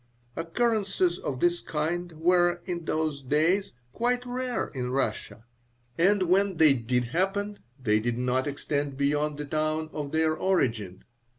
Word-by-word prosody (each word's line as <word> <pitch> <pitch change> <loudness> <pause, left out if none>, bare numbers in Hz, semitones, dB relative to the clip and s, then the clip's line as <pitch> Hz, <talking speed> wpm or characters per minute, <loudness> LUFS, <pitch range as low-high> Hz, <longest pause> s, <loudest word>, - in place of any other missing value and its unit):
Occurrences 195 -1 0
of 130 -3 -4
this 175 0 +3
kind 170 +3 -2
were, 175 +2 +2
in 170 -2 -4
those 155 -3 -1
days, 160 +9 +1 0.2
quite 245 - 0
rare 250 0 -2
in 125 -3 -4
Russia, 130 -3 -2 0.5
and 190 +3 +3
when 190 +1 +2
they 155 -3 +6
did 125 0 0
happen 195 - -1 0.2
they 110 -4 +2
did 120 +1 -1
not 125 +2 0
extend 145 -1 -2
beyond 145 +1 0
the 150 - -4
town 155 +1 -1
of 145 -2 -4
their 160 0 +2
origin. 115 - 0
160 Hz, 140 wpm, -27 LUFS, 140-185 Hz, 0.5 s, they